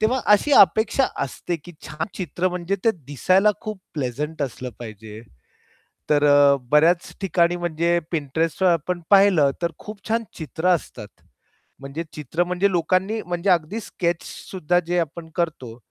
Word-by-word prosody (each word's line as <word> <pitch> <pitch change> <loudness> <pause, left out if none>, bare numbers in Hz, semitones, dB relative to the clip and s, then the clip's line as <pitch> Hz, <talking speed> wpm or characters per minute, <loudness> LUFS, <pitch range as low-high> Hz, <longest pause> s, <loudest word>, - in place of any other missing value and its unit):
तेव्हा 245 +4 +1
अशी 285 +8 +3
अपेक्षा 220 - +4 0.2
असते 170 +6 -4
की 175 +3 -14
छान 160 +1 -4
चित्र 180 0 -2
म्हणजे 180 +2 -2
ते 225 - +5 0.2
दिसायला 185 - +3
खूप 215 -3 -6
प्लेझंट 150 +3 -3
असलं 125 -1 -5
पाहिजे. 110 -1 -9 0.9
तर 150 -1 +3
अ, 145 -1 +6 0.2
बऱ्याच 165 +4 +3
ठिकाणी 175 -2 +2
म्हणजे 170 0 0
Pinterestवर 160 +4 0
आपण 175 +2 -1
पाहिलं 195 -8 +5
तर 170 - 0
खूप 210 -2 -10
छान 230 +1 +1
चित्र 160 +2 -3
असतात. 165 - -8 0.7
म्हणजे 140 +4 -6
चित्र 155 +4 -2
म्हणजे 180 +3 +1
लोकांनी 185 +5 0
म्हणजे 175 +2 -2
अगदी 180 +4 +1
स्केच 170 -5 -2
सुद्धा 175 -1 -2
जे 175 +1 0
आपण 165 0 -4
करतो. 140 -9 -3
170 Hz, 145 wpm, -22 LUFS, 150-185 Hz, 0.9 s, अ